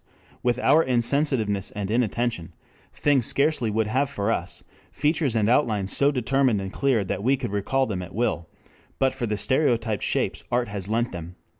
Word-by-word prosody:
What 120 -1 +1
with - - -8
our 160 - +6
insensitiveness 120 -6 +1
and 100 -1 -5
inattention, 115 -6 -1 0.4
things 140 -5 +1
scarcely 140 -5 +1
would 110 +1 0
have 130 +6 0
for 100 +2 -1
us 90 -5 -3 0.3
features 150 -4 0
and 105 -2 +2
outlines 110 -6 +2
so 140 - +5
determined 130 -3 +1
and 95 0 -6
clear 130 -6 +1
that 95 0 -3
we 135 +3 +3
could 105 - -4
recall 120 +7 0
them 100 -6 -3
at 90 - -9
will, 105 -8 -1 0.5
but 135 -1 +2
for 120 - -3
the 105 -1 -1
stereotyped 115 - +1
shapes - - -1
art 120 -2 0
has 100 -1 -4
lent 120 +2 0
them." 85 0 -8
115 Hz, 180 wpm, -24 LUFS, 100-135 Hz, 0.5 s, our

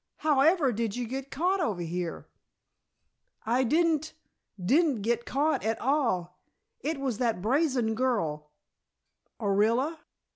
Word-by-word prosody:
However 300 0 +3
did 225 -2 -2
you 245 0 -2
get 265 +3 -5
caught 360 +8 0
over 205 - -1
here?" 170 0 -4 1.2
"I 245 +4 +2
didn't 315 +3 +1 0.4
didn't 260 - +2
get 235 +1 -1
caught 295 +4 +1
at 220 +1 -1
all. 230 - 0 0.4
It 300 +2 -3
was 260 -6 -2
that 230 -6 0
brazen 250 - +1
girl 185 -12 -1 0.5
" - - -50
"Orilla?" 230 +9 +1
250 Hz, 120 wpm, -28 LUFS, 215-295 Hz, 1.2 s, However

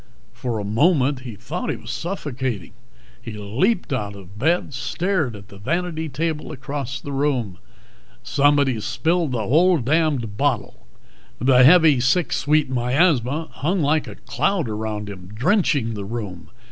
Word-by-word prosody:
For 120 -1 -3
a 105 - -3
moment 135 - +2
he 125 -4 -8
thought 110 +3 -5
he - - 0
was - - -8
suffocating. 130 - -4 0.5
He 115 -1 -7
leaped 130 - 0
out 105 -5 -3
of 95 +1 -13
bed, 160 +2 +1
stared 145 - -1
at 100 0 -12
the 100 - -13
vanity 160 - -2
table 155 +3 -3
across 135 -3 -5
the 145 - -7
room. 135 -9 -1 0.7
"_Somebody's 140 -5 +2
spilled 165 +4 0
the 115 -3 -1
whole 175 +6 +4
damned 140 -6 0
bottle 125 -8 -1 0.6
_" - - 0
The 125 -1 +6
heavy 155 -1 +7
sick 130 +8 +2
sweet 150 +1 +2
miasma 135 +3 +1
hung 175 +4 -1
like 150 +2 +1
a - - -8
cloud 150 - -1
around 105 -1 -4
him, 95 -3 -9
drenching 145 - +1
the 100 -2 -5
room. 100 -6 -6
130 Hz, 150 wpm, -22 LUFS, 115-160 Hz, 0.7 s, heavy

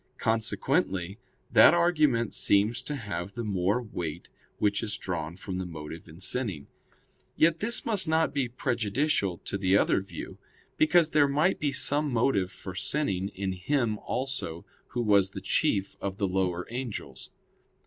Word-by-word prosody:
Consequently 110 - 0 0.3
that - - +8
argument 150 -10 +2
seems 105 +5 +2
to 145 +3 -4
have 100 -6 -5
the 120 - -3
more 100 +3 0
weight 85 -6 -5 0.3
which 100 -1 +1
is 105 -2 -2
drawn 85 -3 -4
from 95 0 -5
the 95 - -3
motive 80 -1 -8
in 80 +2 -13
sinning. 95 - -2 0.7
Yet 165 0 +3
this 230 +2 +1
must 210 -7 +1
not 160 -2 +2
be 140 -3 0
prejudicial 120 - 0
to 95 - -3
the 95 0 +4
other - - +2
view; 95 - -9 0.4
because 160 0 +4
there 145 -2 +5
might 150 +7 +2
be 145 -2 0
some 145 +2 +1
motive 115 -6 +1
for 95 - -8
sinning 95 -2 -1
in 95 0 -2
him 110 +3 0
also 125 -11 -4 0.2
who 120 - -2
was 100 -3 +4
the - - -7
chief 100 -1 0
of 95 -1 -3
the 100 - 0
lower 90 -1 -1
angels. 125 -3 -6
105 Hz, 155 wpm, -28 LUFS, 95-140 Hz, 0.7 s, that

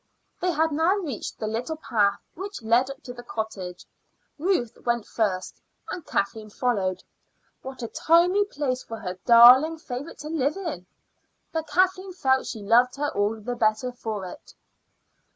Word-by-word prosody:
They 365 - 0
had 320 -1 +1
now 325 +6 +2
reached 310 - -5
the 220 - -4
little 235 +9 -3
path 205 -9 +1
which 390 - -7
led 235 +4 +3
up 275 - -9
to 245 - -7
the 240 - -9
cottage. 215 -6 -6 0.5
Ruth 320 - 0
went 235 -2 0
first, 195 -5 -2 0.3
and 360 - -5
Kathleen 215 -1 -2
followed. 200 -6 -1 0.6
What 265 -1 -8
a - - -2
tiny 350 - +3
place 275 -9 -2
for 225 - -7
her 185 -4 -6
darling 250 +7 +8
favorite 280 0 -7
to 300 - -7
live 300 0 0
in! 315 - -5 0.6
But 320 -1 -3
Kathleen 370 +1 +1
felt 265 -6 +1
she 220 -3 -6
loved 240 +4 +4
her 290 +1 -1
all 210 +2 0
the 245 +3 -4
better 225 +2 +1
for 220 -5 -5
it. 180 - -11
250 Hz, 160 wpm, -25 LUFS, 220-320 Hz, 0.6 s, darling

